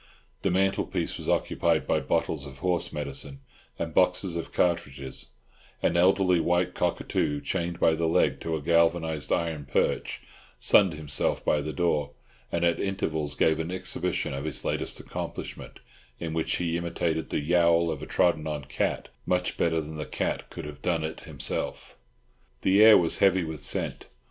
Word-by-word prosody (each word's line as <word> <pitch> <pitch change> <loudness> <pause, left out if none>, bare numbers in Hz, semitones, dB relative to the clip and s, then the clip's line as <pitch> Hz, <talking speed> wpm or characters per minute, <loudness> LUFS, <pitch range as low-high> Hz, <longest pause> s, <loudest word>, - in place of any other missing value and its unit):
The - - +1
mantelpiece 95 +2 0
was - - -5
occupied - - +1
by - - +2
bottles 70 -3 -1
of 65 -1 -11
horse 90 +5 -1
medicine 70 -1 -5 0.4
and 80 -1 -4
boxes 90 0 +2
of 85 - -4
cartridges; 70 -6 -1 0.6
an - - +2
elderly 90 0 +4
white 90 +2 +1
cockatoo, 75 -2 -1
chained 85 +1 -3
by 80 - +4
the 80 +1 0
leg 80 - +2
to 80 - -2
a 75 - -5
galvanised 85 -2 +2
iron 80 -4 -1
perch, - - 0 0.4
sunned 95 -5 +5
himself 75 -3 -1
by 75 - +2
the 75 - -4
door, 75 -4 0 0.4
and 85 0 +1
at 85 -1 +2
intervals 80 -7 -1
gave 80 0 +2
an 80 +1 -2
exhibition 90 -6 -2
of 70 +2 -4
his 80 - -1
latest - - -1
accomplishment, - - -7 0.4
in 80 -2 -4
which 80 0 0
he 85 -1 -1
imitated 85 -1 -2
the - - 0
yowl 85 +1 +3
of 75 -2 -5
a 75 - -7
trodden 80 -3 +2
on 75 -2 -3
cat 65 - -2 0.2
much 90 0 0
better 80 -1 +1
than 80 0 -6
the 75 - -4
cat - - -2
could - - -7
have 75 -1 -9
done 85 -3 0
it 80 0 -4
himself. - - -4 0.7
The 100 +3 +5
air 110 -1 +10
was 85 -2 +2
heavy 95 -2 +4
with 80 -2 -5
scent. - - 0
80 Hz, 170 wpm, -27 LUFS, 75-85 Hz, 0.7 s, air